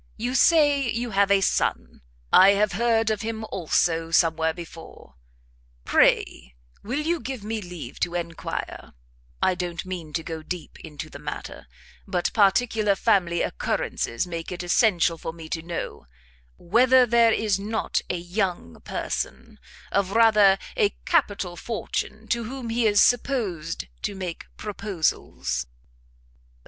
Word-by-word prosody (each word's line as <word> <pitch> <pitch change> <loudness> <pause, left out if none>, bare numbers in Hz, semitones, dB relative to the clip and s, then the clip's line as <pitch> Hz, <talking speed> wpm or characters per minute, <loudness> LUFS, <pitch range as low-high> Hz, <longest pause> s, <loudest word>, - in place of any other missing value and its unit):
You 240 +3 -2
say 285 -2 +4
you 235 +1 -2
have 200 0 +3
a 200 -1 +4
son; - - -1 0.3
I 195 +2 +8
have 205 +1 +2
heard 225 +2 +2
of 215 - -2
him, 220 0 -4
also, 165 -1 0
somewhere 160 -1 +2
before; 165 - -11 0.7
pray 60 0 +2 0.3
will 250 +8 -2
you 335 +2 0
give 260 -7 -6
me 220 +1 -3
leave 180 -3 -9
to 175 - -1
enquire 170 -1 -5 0.5
I 185 - +4
don't 175 0 -4
mean 175 -4 -6
to 165 - -2
go 160 -1 -6
deep 175 +2 -7
into 150 -2 -8
the - - -9
matter, - - -7 0.4
but 180 -3 -1
particular 210 0 +3
family 185 -5 +2
occurrences 115 - -2
make 170 -1 -6
it 180 0 -5
essential 175 -3 +2
for 165 - -5
me 165 -1 -10
to 160 - -3
know, 165 - -6 0.5
whether 250 +7 +4
there 235 -1 +4
is 210 -3 +1
not 215 +3 -1
a 180 - -1
young 175 - -3
person - - -4 0.3
of 200 -1 0
rather 215 -4 +6 0.2
a 425 -5 +2
capital 205 - +1
fortune, 220 +1 -4
to 235 -1 0
whom 245 -1 -6
he 230 0 +2
is 205 -1 +5
supposed 205 - 0 0.2
to 200 - -3
make 180 -3 -6
proposals?" 165 - -2
195 Hz, 140 wpm, -25 LUFS, 170-225 Hz, 0.7 s, I